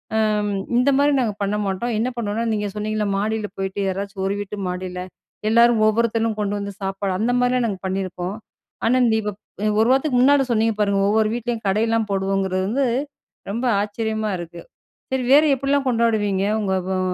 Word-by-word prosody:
அம் 210 -1 +1 0.3
இந்த 250 +3 +4
மாதிரி 285 +1 +3
நாங்க 230 -5 0
பண்ண 200 +1 0
மாட்டோம். 200 +5 -2
என்ன 235 - +1
பண்ணுவோம்னா 225 0 -2
நீங்க 210 -1 -1
சொன்னீங்கள்ல, 210 0 -1
மாடியில 215 +1 -1
போயிட்டு 195 +1 -3
யாராச்சும் 195 +1 -3
ஒரு 195 - 0
வீட்டு 205 0 -5
மாடியில 180 0 -4 0.5
எல்லாரும் 235 0 +5
ஒவ்வொருத்தனும் 225 0 +1
கொண்டு 205 -1 -1
வந்து 200 0 -4
சாப்பாடு 195 0 -2
அந்த 230 +4 +1
மாரிலாம் 250 0 +2
நாங்க 195 -3 -4
பண்ணியிருக்கோம். 185 0 -3 0.5
ஆனா, 245 +3 +3
நீ 220 - +2
இப்ப 210 0 -3 0.5
ஒரு 225 - +3
வாரத்துக்கு 265 0 +2
முன்னாடி 280 +1 +5
சொன்னிங்க 225 -1 +2
பாருங்க, 200 -1 +2
ஒவ்வொரு 215 0 +2
வீட்லயும் 235 -2 -3
கடைலாம் 225 +2 +1
போடுவோங்கிறது 195 -1 0
வந்து, 270 +6 +1 0.7
ரொம்ப 235 +5 -2 0.2
ஆச்சரியமா 220 0 -2
இருக்கு. 170 0 -8 0.5
சரி 265 -1 0
வேறு 300 +2 +7
எப்டிலாம் 275 +1 0
கொண்டாடுவீங்க? 215 -5 +1 0.2
உங்க 195 -2 -1 0.2
அ, - - -1
215 Hz, 165 wpm, -22 LUFS, 195-235 Hz, 0.7 s, வேறு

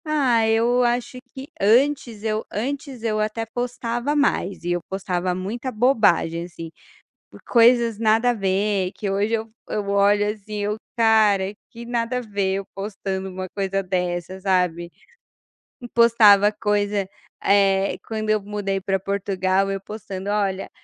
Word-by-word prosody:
Ah, 260 -7 +2
eu 235 +3 +3
acho 245 +1 -1
que 265 +1 -9
antes 235 0 +2
eu 215 -1 -1
antes 265 +2 -4
eu 215 -2 0
até 215 +2 -2
postava 245 +3 -3
mais, 240 -11 0
e 175 - -2
eu 175 0 0
postava 185 -2 -2
muita 225 +8 -4
bobagem 215 -9 +2
assim, 165 -2 -9 0.8
coisas 235 -2 +4
nada 225 +2 +3
a - - +2
ver 195 -2 0
que 205 - -4
hoje 200 +3 0
eu 225 0 -2 0.2
eu 205 -1 -3
olho 205 +1 +3
assim 210 0 -8
eu: 205 +1 -1 0.2
"Cara 215 -4 +3 0.2
que 235 +1 -10
nada 235 +1 -1
a - - -2
ver 200 -4 -1
eu 195 - -5
postando 195 -1 -4
uma 185 0 -6
coisa 195 0 -2
dessa 180 0 -3
sabe". 180 -3 0 1.0
Postava 215 -3 +6
coisa, 205 -2 -1 0.3
eh, 195 -1 +3
quando 215 -1 -4
eu 215 -1 +2
mudei 200 -1 -3
para 195 0 -1
Portugal, 195 0 0
eu 195 0 -3
postando: 195 -1 -7
"Olha, 200 -2 -1
205 Hz, 145 wpm, -22 LUFS, 195-230 Hz, 1.0 s, Postava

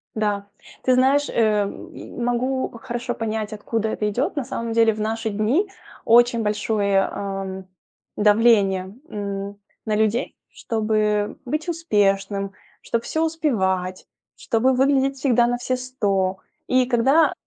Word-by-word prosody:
Да. 205 -2 -1 0.4
Ты 255 - +3
знаешь, 275 +3 +3
э, 215 -2 +2
м, 200 +4 -7
могу 255 +2 0
хорошо 240 -1 -3
понять, 220 -1 -3
откуда 220 +1 -2
это 210 -1 -1
идёт. 245 +7 -1
На 285 - -1
самом 230 -2 -4
деле 225 -1 +4
в 215 - -8
наши 220 +1 -2
дни 220 - +1 0.4
очень 235 0 +5
большое, 205 -1 +1
а, 195 -1 -4 0.5
давление, 205 -3 +3 0.2
м, 200 -1 -5 0.3
на 215 -1 0
людей, 220 +4 0
чтобы 215 -2 -1
быть 305 +6 -2
успешным, 200 - 0 0.3
чтоб 235 0 -2
всё 315 - -1
успевать, 190 - -1 0.3
чтобы 245 +3 +1
выглядеть 270 +1 +2
всегда 245 -3 +3
на 245 0 0
все 255 +1 -2
100. 200 -7 -1 0.3
И 255 0 +3
когда, 265 +6 +4
225 Hz, 130 wpm, -22 LUFS, 205-255 Hz, 0.5 s, очень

